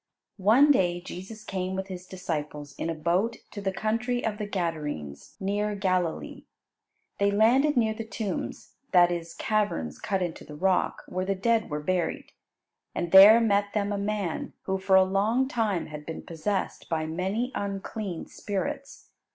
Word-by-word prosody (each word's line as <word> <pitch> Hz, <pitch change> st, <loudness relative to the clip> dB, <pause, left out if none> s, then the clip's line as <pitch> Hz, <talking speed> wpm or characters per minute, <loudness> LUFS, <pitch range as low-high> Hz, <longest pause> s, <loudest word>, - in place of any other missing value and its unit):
One 250 Hz, +10 st, +6 dB
day 175 Hz, -9 st, +2 dB
Jesus 190 Hz, +5 st, -9 dB
came 190 Hz, -2 st, -3 dB
with 190 Hz, 0 st, -2 dB
His 185 Hz, -1 st, -8 dB
disciples 150 Hz, -6 st, -5 dB
in 165 Hz, -, -2 dB
a 165 Hz, -, -2 dB
boat 180 Hz, +9 st, 0 dB
to 205 Hz, -, -6 dB
the 195 Hz, -1 st, 0 dB
country 230 Hz, +5 st, -1 dB
of 215 Hz, -1 st, -2 dB
the 210 Hz, -, -3 dB
Gadarenes, 150 Hz, -, -4 dB
near 205 Hz, +2 st, -1 dB
Galilee. 185 Hz, -4 st, -1 dB, 0.7 s
They 200 Hz, 0 st, +4 dB
landed 245 Hz, +8 st, +4 dB
near 220 Hz, -2 st, +3 dB
the 225 Hz, +1 st, -5 dB
tombs, 220 Hz, -4 st, -5 dB, 0.2 s
that 175 Hz, -1 st, +6 dB
is, 170 Hz, -1 st, -4 dB
caverns 200 Hz, -, -1 dB
cut 195 Hz, -2 st, -1 dB
into 175 Hz, -2 st, -5 dB
the 150 Hz, -, -10 dB
rock, 185 Hz, +4 st, +1 dB
where 185 Hz, +1 st, -2 dB
the 195 Hz, +1 st, 0 dB
dead 225 Hz, +3 st, +1 dB
were 150 Hz, -1 st, -3 dB
buried. 180 Hz, 0 st, -1 dB, 0.6 s
And 170 Hz, -1 st, -2 dB
there 200 Hz, +4 st, +10 dB
met 205 Hz, -3 st, +2 dB
them 205 Hz, -1 st, 0 dB
a 205 Hz, -, -1 dB
man, 200 Hz, -4 st, -2 dB
who, 190 Hz, 0 st, -1 dB
for 190 Hz, 0 st, +3 dB
a 190 Hz, -, +8 dB
long 210 Hz, +7 st, +1 dB
time, 215 Hz, -, 0 dB
had 150 Hz, -1 st, -8 dB
been 160 Hz, -, -6 dB
possessed 190 Hz, +5 st, -3 dB
by 160 Hz, -2 st, 0 dB
many 190 Hz, +10 st, -2 dB
unclean 200 Hz, -2 st, -4 dB
spirits. 275 Hz, +8 st, -5 dB
195 Hz, 165 wpm, -27 LUFS, 175-215 Hz, 0.7 s, there